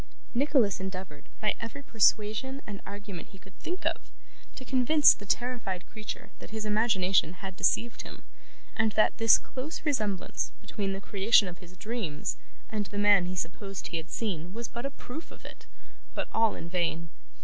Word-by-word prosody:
Nicholas 250 -6 +3
endeavoured, 185 -6 -6
by 210 -1 +3
every 235 +5 -6
persuasion 225 +4 +2
and 200 -2 -7
argument 200 -3 -7
he 195 - -15
could 190 0 -17
think 360 +3 -4
of, - - -1 0.5
to 260 - -8
convince 265 +4 +6
the 205 - -11
terrified 230 -7 -1
creature 215 -1 -7
that - - -10
his 220 0 -4
imagination 205 -5 +3
had 190 0 -7
deceived 235 +5 +1
him, - - -10 0.5
and 220 -1 +2
that 215 - +4
this 225 -1 +7
close 270 +7 -6
resemblance 215 - -1
between 200 -3 -3
the 195 - -5
creation 200 +1 +5
of 175 -1 -7
his 180 0 -14
dreams 210 -8 -3 0.3
and 210 -2 -2
the 205 - -7
man 205 -3 +5
he 185 - -3
supposed 195 +2 -4
he 170 - -2
had 165 +1 -6
seen 180 -4 -3
was 235 0 -3
but 235 +3 -4
a - - -4
proof 280 +3 -8
of - - -15
it; - - -11 0.5
but - - -2
all 225 -1 +3
in 165 - -6
vain. 165 -2 -1
210 Hz, 175 wpm, -29 LUFS, 185-235 Hz, 0.5 s, this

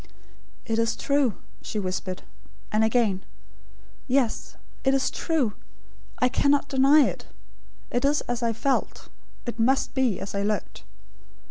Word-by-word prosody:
"It 225 0 0
is 230 0 +1
true," 280 -6 +1 0.3
she - - -5
whispered; 185 -1 -3 0.5
and 215 +1 +3
again: 220 -4 +2 0.8
"Yes; 255 -3 0 0.3
it 270 0 +3
is 265 -1 +1
true. 295 -11 0 0.6
I 250 - +3
cannot 280 +3 +2
deny 275 +3 +6
it. - - -3 0.6
It 245 - 0
is 290 +2 +3
as 245 0 -3
I 230 -1 +1
felt; 265 +5 -1 0.4
it 240 -1 -5
must 265 +4 +2
be 255 -8 +1
as 195 - -6
I 200 - -1
looked." 210 +1 -2
245 Hz, 135 wpm, -26 LUFS, 215-275 Hz, 0.8 s, deny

